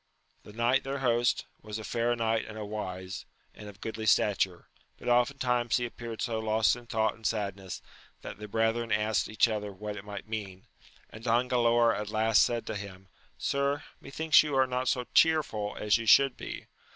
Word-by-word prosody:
The - - -13
knight 120 +4 +1
their 135 +1 -3
host, 120 -2 +1 0.2
was 105 0 -6
a 110 - -7
fair 120 +2 0
knight 115 -1 0
and 110 0 -8
a 105 - -5
wise, 95 -2 -6 0.3
and 105 - -10
of 100 -1 -15
goodly 110 -1 -4
stature; 95 -4 +2 0.3
but - - -10
oftentimes 125 -1 +2
he 120 - -1
appeared 115 -1 -6
so 115 -2 -1
lost 110 0 +2
in 120 -1 -12
thought 110 -1 +1
and 115 - -20
sadness, 100 -4 -3 0.4
that - - -8
the 105 - -7
brethren 115 +2 0
asked 110 0 +1
each 110 +2 +3
other 105 -2 -3
what 105 +2 -6
it 100 - -8
might 105 0 -8
mean, 100 -4 -6 0.5
and 110 - -11
Don 120 +2 +2
Galaor 120 -1 +3
at 105 0 -4
last 110 +1 +3
said 120 -1 +1
to 110 - -4
him, 95 -2 -8 0.3
Sir, 140 +1 0 0.2
methinks 155 +3 +4
you 150 -2 -2
are 130 0 +4
not 130 0 -2
so 125 0 +1
chearful 145 -11 +2
as 105 +2 +2
you 115 - -5
should 135 +2 +6
be - - -7
110 Hz, 190 wpm, -29 LUFS, 105-120 Hz, 0.5 s, should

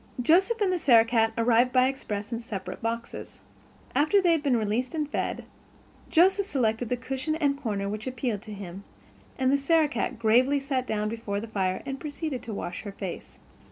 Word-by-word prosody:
Joseph 370 - +3
and 390 -3 +3
the 360 - 0
Sarah 235 -7 +6
cat 225 -1 +2
arrived 235 +2 +3
by 255 0 +4
express 210 -6 -4
in 230 - -2
separate 210 -5 -6
boxes. 230 +1 -5 0.5
After 305 +9 +4
they 360 -3 +3
had 325 -2 +2
been 275 -5 +2
released 225 +7 -1
and 305 -2 -1
fed, - - -3 0.6
Joseph 380 +4 +4
selected 230 - 0
the 250 - 0
cushion 265 +5 -3
and 290 -3 +1
corner 200 -4 -2
which 215 +4 -5
appealed 245 -5 -2
to 220 -1 -11
him, 195 -1 -8 0.5
and 260 0 +2
the 280 - +3
Sarah 315 +2 +3
cat 245 -1 -3
gravely 245 +5 +3
sat 270 -2 -2
herself - - -25
down 210 -1 -1
before 215 -3 -3
the 225 - -6
fire 190 -4 -1
and 270 -1 -4
proceeded 300 -3 -4
to 225 - -7
wash 180 -3 -5
her 200 0 -7
face. 195 -3 -7
245 Hz, 195 wpm, -27 LUFS, 215-285 Hz, 0.6 s, Sarah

